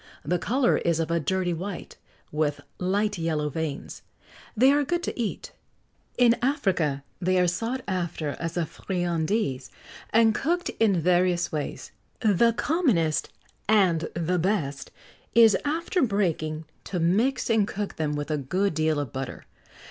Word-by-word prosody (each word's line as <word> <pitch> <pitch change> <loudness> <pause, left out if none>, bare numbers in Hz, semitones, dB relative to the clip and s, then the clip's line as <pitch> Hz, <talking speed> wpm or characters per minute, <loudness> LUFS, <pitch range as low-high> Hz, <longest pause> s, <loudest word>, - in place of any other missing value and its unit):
The 175 +4 +1
colour 250 +6 +2
is 170 -1 +1
of 165 0 -1
a 170 - +2
dirty 175 +3 0
white, 185 +3 -6 0.4
with 150 -1 -1 0.2
light 200 +2 0
yellow 155 -2 0
veins; 155 -1 -5 0.6
they 260 +5 +6
are 290 +1 +3
good 345 +5 -1
to - - -4
eat. 220 - -4 0.7
In 240 -1 +5
Africa 185 - 0 0.2
they 185 +1 +2
are 180 - +4
sought 230 +9 -2
after 175 -5 -2
as 165 +1 -4
a 170 - +1
friandise, 175 - -2 0.4
and 225 0 +4
cooked 345 +9 0
in 200 -6 +3
various 175 +1 +2
ways. 150 -2 -4 0.3
The 230 +1 +3
commonest 235 - +1 0.4
and 180 -7 +3
the 170 +1 0
best 160 -7 -1 0.5
is, 225 -2 +7
after 330 +5 0
breaking, 165 - 0 0.2
to 180 - -3
mix 210 +11 +2
and 220 -3 +3
cook 205 -1 -4
them 150 -2 -1
with 145 +1 -3
a 155 - +1
good 185 +9 0
deal 155 -1 +1
of 140 -5 -4
butter. 135 -1 -5
180 Hz, 150 wpm, -26 LUFS, 160-220 Hz, 0.7 s, is